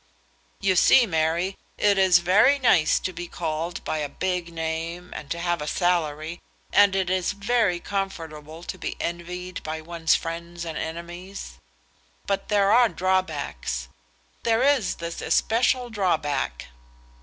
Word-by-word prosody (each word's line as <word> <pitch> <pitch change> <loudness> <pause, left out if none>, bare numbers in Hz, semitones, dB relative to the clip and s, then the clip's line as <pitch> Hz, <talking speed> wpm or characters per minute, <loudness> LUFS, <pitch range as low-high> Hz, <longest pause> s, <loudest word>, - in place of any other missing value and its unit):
"You 190 -1 +2
see, 240 +7 +6
Mary, 170 +1 0 0.2
it 200 -1 +3
is 185 -2 +6
very 215 +10 +5
nice 175 - +4
to 185 - -4
be 175 +1 -6
called 165 +1 -4
by 155 - -2
a 145 -1 -2
big 180 +2 -2
name 165 +2 -4
and 145 - -7
to 170 - -2
have 175 -1 -1
a 150 - -4
salary, 165 -2 0 0.3
and 205 -1 +6
it 190 -2 +1
is 185 +1 0
very 200 -3 +1
comfortable 165 -5 -5
to - - -6
be - - -4
envied 180 +2 -5
by 155 +1 -4
one's 165 0 +1
friends 170 +1 -5
and 165 -2 -5
enemies; 175 +5 -7 0.7
but 195 0 -1
there 200 -1 +3
are 240 0 +6
drawbacks. 160 - -1 0.5
There 230 +1 +2
is 275 -7 +3
this 170 0 -6
especial 245 +2 +2
drawback." 155 - -1
175 Hz, 145 wpm, -25 LUFS, 160-195 Hz, 0.7 s, see